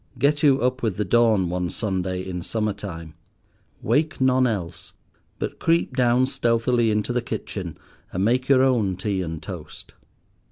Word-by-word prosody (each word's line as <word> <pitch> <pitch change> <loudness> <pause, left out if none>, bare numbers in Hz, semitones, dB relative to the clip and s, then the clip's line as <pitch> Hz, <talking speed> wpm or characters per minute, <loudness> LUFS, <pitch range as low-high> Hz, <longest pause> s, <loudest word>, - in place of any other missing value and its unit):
Get 145 +1 +2
you 140 -3 +5
up 130 +1 0
with 110 -6 -1
the 105 - 0
dawn 110 -2 +3
one 90 0 -2
Sunday 95 -2 -3
in 90 -1 -4
summer 105 +3 -1
time. 85 -6 -8 0.7
Wake 155 +1 +1
none 130 -1 +3
else, 90 -7 -4 0.4
but - - -5
creep 165 -5 +1
down 125 0 +3
stealthily 120 -2 +1
into 105 +3 0
the 125 - +1
kitchen, 115 - -5 0.3
and 95 +2 0
make 125 +4 +1
your 130 -1 +6
own 115 -8 +2
tea 95 +1 -2
and 80 -3 -5
toast. 85 -6 -9
110 Hz, 160 wpm, -23 LUFS, 95-130 Hz, 0.7 s, your